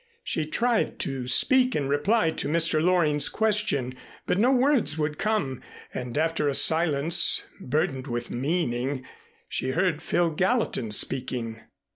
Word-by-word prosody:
She 155 - -2
tried 235 +8 0
to 135 -3 -3
speak 255 - +3
in 140 -2 -1
reply 160 +6 +2
to - - -3
Mr. 160 0 +2
Loring's 155 -5 +2
question, 210 - 0 0.3
but 185 - 0
no 245 +5 +4
words 260 - +2
would 150 -1 -2
come 195 - -1 0.3
and 125 +1 -5
after 160 -1 0
a 140 - 0
silence 160 0 +2
burdened 145 -3 -2
with 120 -1 -4
meaning 130 -2 -2 0.4
she 130 0 -2
heard 165 -1 0
Phil 170 0 +1
Gallatin 185 - 0
speaking. 115 0 -2
155 Hz, 135 wpm, -26 LUFS, 135-185 Hz, 0.4 s, no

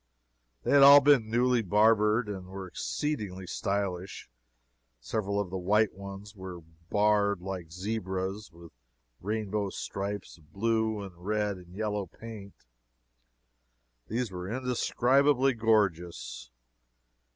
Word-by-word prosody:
They - - -1
had 140 - +7
all 140 +1 +11
been 140 -6 +4
newly 120 +1 +2
barbered, 105 +2 +3
and 95 -3 -6
were 95 0 -7
exceedingly 105 - -3
stylish. 95 -7 -3 0.7
Several 100 - -2
of 95 -3 -3
the 95 - -3
white 105 +4 +2
ones 100 +2 -9
were 95 -3 -8 0.3
barred 105 -1 +2
like 90 -3 -6
zebras 95 +1 -4
with 85 0 -14 0.5
rainbow 105 0 -2
stripes 100 -1 -5
of 75 0 -24
blue 110 +1 0
and 95 -3 -9
red 105 0 -1
and 90 0 -14
yellow 105 -2 -2
paint. 105 0 -10 1.5
These 115 -1 -2
were 90 0 -6
indescribably 130 +2 +2
gorgeous. 105 - 0
105 Hz, 115 wpm, -29 LUFS, 95-110 Hz, 1.5 s, all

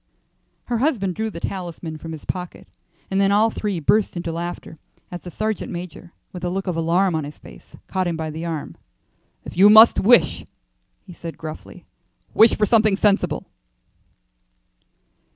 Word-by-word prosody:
Her 240 -2 -2
husband 225 - 0
drew 220 +4 -3
the 170 - -8
talisman 170 -4 -6
from 160 +1 -7
pocket, 180 +3 -7 0.4
and 195 +1 +1
then 195 0 +3
all 215 +2 +3
three 205 -5 -3
burst 200 +4 +1
into 170 -1 -3
laughter 170 -1 -6 0.3
as 175 -1 -6
the 180 - -9
sergeant 215 +4 -3
major, 175 -1 -8 0.2
with 180 -1 -8
a 175 - -1
look 195 +2 -3
of 180 -3 -2
alarm 170 +3 +1
on 160 -1 -1
his 145 +1 -9
face, - - -15
caught 185 -1 -2
him 170 -2 -2
by 160 -1 -4
the 160 +2 -6
arm. 165 -3 -5 0.7
"If - - -8
you 195 +4 +7
must 220 +2 +8
wish," 240 +4 +4 0.6
he 185 - -11
said, 170 -1 -8
gruffly, 155 -1 -9 0.5
"wish 225 +1 +5
for 210 - +3
something 215 -2 +3
sensible." 195 -7 +1
180 Hz, 165 wpm, -21 LUFS, 165-205 Hz, 0.7 s, must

